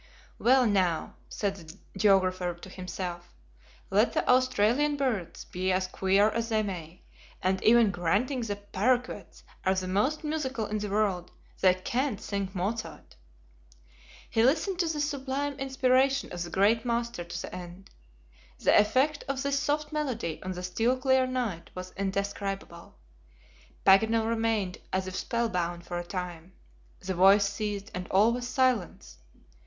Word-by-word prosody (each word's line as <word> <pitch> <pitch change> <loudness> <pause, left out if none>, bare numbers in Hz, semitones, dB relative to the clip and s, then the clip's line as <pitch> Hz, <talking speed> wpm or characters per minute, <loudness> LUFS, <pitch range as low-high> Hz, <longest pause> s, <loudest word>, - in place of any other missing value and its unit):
"Well, 255 +1 +5
now," 185 -6 +1 0.2
said 200 -2 -2
the 165 +1 -12 0.2
geographer 185 -3 +2
to 175 +2 -12
himself, 180 -1 -6 0.6
"let 210 +5 +3
the - - 0
Australian 255 +3 +3
birds 235 -11 -2
be 185 +1 -2
as 185 0 +1
queer 195 +3 +2
as 230 +1 -2
they 220 -1 +1
may, 180 -4 -7 0.4
and 190 +1 0
even 230 -2 +6
granting 200 - 0
the 210 -3 -2
paroquets 220 +5 -2 0.2
are 190 0 +2
the 185 -1 -2
most 235 +13 0
musical 270 -7 -2
in 210 +1 -3
the 210 0 -4
world, 195 -4 0 0.3
they 185 -1 +5
can't 240 +4 -2
sing 200 -2 -3
Mozart!" 205 +5 -4 1.1
He 225 - +1
listened 320 - +2
to 345 - +2
the 315 -2 -2
sublime 285 -1 -2
inspiration 265 0 +2
of 175 - -5
the 175 - -4
great 210 +5 +3
master 235 -5 -2
to 170 - -6
the - - -8
end. 180 +2 -9 0.7
The - - +3
effect 260 +8 +3
of 270 0 -2
this 280 0 +1
soft 300 +1 -1
melody 245 - -2
on 185 0 -4
the 180 0 -7
still 225 +8 +1
clear 260 0 +3
night 240 -10 -3
was 185 0 -7
indescribable. 195 -2 -4 0.9
Paganel 220 +3 +5
remained 225 -5 0
as 190 0 0
if 185 -1 -6
spellbound 180 -9 -2
for 175 0 -4
a - - -4
time; 180 -1 -6 0.5
the 190 +1 -3
voice 195 +3 +6
ceased 205 0 -4
and 180 0 -5
all 210 +5 +4
was 245 0 -3
silence. 250 - 0
205 Hz, 150 wpm, -28 LUFS, 185-255 Hz, 1.1 s, even